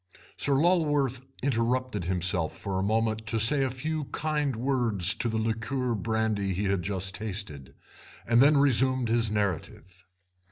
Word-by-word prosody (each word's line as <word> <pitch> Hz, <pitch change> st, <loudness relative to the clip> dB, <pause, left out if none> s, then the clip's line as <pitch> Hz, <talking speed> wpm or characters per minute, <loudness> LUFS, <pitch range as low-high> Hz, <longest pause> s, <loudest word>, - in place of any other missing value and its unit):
Sir 140 Hz, -, 0 dB
Lulworth 145 Hz, -5 st, +2 dB, 0.2 s
interrupted 125 Hz, -5 st, 0 dB
himself 90 Hz, -2 st, 0 dB
for 95 Hz, -2 st, -3 dB
a -, -, 0 dB
moment 110 Hz, +1 st, 0 dB
to 115 Hz, -, -1 dB
say 135 Hz, +6 st, +3 dB
a 135 Hz, -, 0 dB
few 150 Hz, +4 st, -3 dB
kind 150 Hz, -3 st, -2 dB
words 115 Hz, -7 st, 0 dB
to 120 Hz, -, -2 dB
the 110 Hz, -, -1 dB
liqueur 115 Hz, +3 st, -1 dB
brandy 110 Hz, -3 st, -1 dB
he 100 Hz, -, -2 dB
had 100 Hz, -2 st, 0 dB
just 95 Hz, 0 st, -2 dB
tasted, 95 Hz, -10 st, -6 dB, 0.5 s
and 120 Hz, +1 st, +4 dB
them 145 Hz, +2 st, +6 dB
resumed 130 Hz, -3 st, +3 dB
his 115 Hz, -1 st, +2 dB
narrative. 95 Hz, -3 st, -3 dB
115 Hz, 150 wpm, -28 LUFS, 100-130 Hz, 0.5 s, them